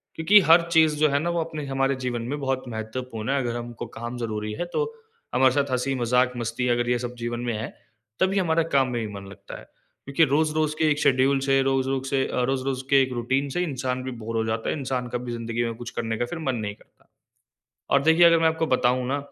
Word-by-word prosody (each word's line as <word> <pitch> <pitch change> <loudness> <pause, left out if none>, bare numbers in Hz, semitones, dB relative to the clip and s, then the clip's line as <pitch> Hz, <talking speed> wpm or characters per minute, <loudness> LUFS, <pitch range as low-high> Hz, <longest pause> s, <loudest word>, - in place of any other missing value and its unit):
क्योंकि 185 +6 +6
हर 165 +1 +8
चीज़ 160 -2 +4
जो 155 0 +4
है 140 0 +1
ना 170 +3 -1
वो 170 0 0
अपने 155 -2 -6
हमारे 135 0 0
जीवन 120 -2 -2
में 145 - -3
बहुत 135 -1 -1
महत्वपूर्ण 110 0 -5
है 140 - +1
अगर 120 -2 -2
हमको 120 -1 -6
काम 120 +2 -5
ज़रूरी 110 -2 -3
है - - 0
तो - - +1 0.5
हमारे 130 0 +5
साथ 140 0 0
हँसी-मज़ाक 125 -1 +1
मस्ती 120 +1 -2
अगर 120 0 -1
ये 125 0 +1
सब 120 0 -5
जीवन 120 0 -3
में 120 -1 -2
है, 110 +2 -4 0.5
तभी 195 +1 +2
हमारा 165 -2 +2
काम 135 -1 +4
में 120 -2 -2
भी 105 - -7
मन 100 -1 -8
लगता 100 - -10
है। - - -13 0.4
क्योंकि 140 +4 +2
रोज़-रोज़ 155 0 +1
के 160 - +3
एक 150 - 0
शेड्यूल 135 0 +3
से, 135 0 +2
रोज़-रोज़ 135 0 0
से 135 -1 +1
अ, - - -1
रोज़-रोज़ 135 0 -1
के 140 -1 +6
1 130 -1 -1
रूटीन 130 +4 -1
से 180 - +1
इंसान 130 -5 -3
भी 130 - -4
बोर 115 +1 -4
हो 110 - 0
जाता 110 0 -2
है - - -1
इंसान 130 -2 -2
कभी 120 0 -4
ज़िंदगी 115 0 -2
में 115 -1 -3
कुछ 120 +1 -7
करने 115 -1 -2
का 165 +8 -5
मन 135 -5 -1
नहीं 105 -3 -4
करता। - - -24 1.0
और 140 - +4
देखिए 160 +3 +5
अगर 165 0 +6
मैं 165 0 +4
आपको 160 0 0
बताऊँ 125 -2 +1
ना? 140 +2 0
130 Hz, 235 wpm, -25 LUFS, 120-145 Hz, 1.0 s, हर